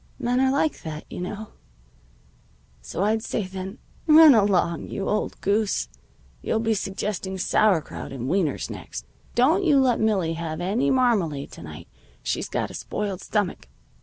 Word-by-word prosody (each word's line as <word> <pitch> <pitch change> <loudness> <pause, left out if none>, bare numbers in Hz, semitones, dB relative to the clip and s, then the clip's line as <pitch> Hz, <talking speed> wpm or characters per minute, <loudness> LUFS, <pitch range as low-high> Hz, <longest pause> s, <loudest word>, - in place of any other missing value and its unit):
"Men 250 -1 0
are 265 0 +4
like 290 +3 0
that, 155 -1 -6
you - - -5
know. 210 +4 -5 1.3
So 185 - -3
I'd 220 +2 +2
say 215 - -2
then: 190 +3 -7 0.3
'Run 310 -1 +9
along, 195 -6 +2
you 195 - -4
old 210 - -1
goose! 200 - +1 0.5
You'll - - 0
be 225 0 +1
suggesting 195 -1 -3
sauerkraut 180 -6 +1
and 130 -2 -5
wieners 175 -2 0
next. - - -7 0.3
Don't 315 +11 +4
you 295 -6 +5
let 255 -3 +3
Millie 195 -7 +1
have 165 -1 -4
any 195 +7 +1
marmalade 210 - +1
to - - -11
night. 75 -2 -10 0.4
She's - - -2
got - - -2
a - - -10
spoiled 200 -3 -4
stomach.' 205 - -2
200 Hz, 155 wpm, -24 LUFS, 175-235 Hz, 1.3 s, Run